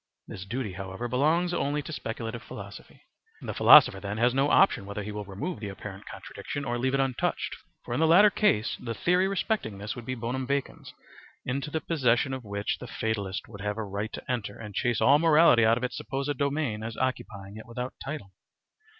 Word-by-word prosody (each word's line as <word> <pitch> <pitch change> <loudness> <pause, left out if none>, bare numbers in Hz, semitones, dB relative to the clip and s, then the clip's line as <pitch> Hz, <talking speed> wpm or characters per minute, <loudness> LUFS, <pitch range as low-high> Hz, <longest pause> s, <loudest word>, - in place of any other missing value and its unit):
This 95 - -8
duty, 110 -1 -3
however, 95 +5 -5
belongs 155 +8 +2
only 145 -3 0
to 155 - -7
speculative 115 -2 -5
philosophy. - - -11 0.4
The - - -5
philosopher 95 - +8
then 100 +2 -4
has 120 +2 +3
no 135 +2 +2
option 150 - +4
whether 100 +1 -4
he 105 - -5
will 105 0 -5
remove 100 - -5
the 105 -2 -5
apparent 95 0 -9
contradiction 145 -1 -6
or 120 -1 -2
leave 130 +2 +1
it - - +1
untouched; 135 -2 -1 0.3
for - - -4
in 120 - 0
the 160 - +4
latter 200 +6 +7
case 195 - +2
the 115 -2 -5
theory 180 - +2
respecting 195 - -1
this 105 +2 -5
would 120 -1 -9
be 130 - -2
bonum 125 +2 -3
vacans, 140 -1 -3 0.5
into 135 +3 -2
the 160 +1 -2
possession 130 -4 +1
of 130 -1 -5
which 100 -1 -3
the - - -8
fatalist 100 -4 -3
would 100 -3 -10
have 105 +1 -2
a 110 - -2
right 105 +2 -4
to - - -6
enter 115 -5 -3
and 105 -2 -8
chase 120 +2 0
all 140 +2 +6
morality 160 -7 +6
out 115 +1 +4
of 125 - -5
its 125 0 -2
supposed 140 +2 -3
domain 140 -5 -1
as 110 +1 -6
occupying 105 -6 -3
it 110 - -10
without 125 +2 -5
title. 140 -9 -6
120 Hz, 205 wpm, -28 LUFS, 105-140 Hz, 0.5 s, philosopher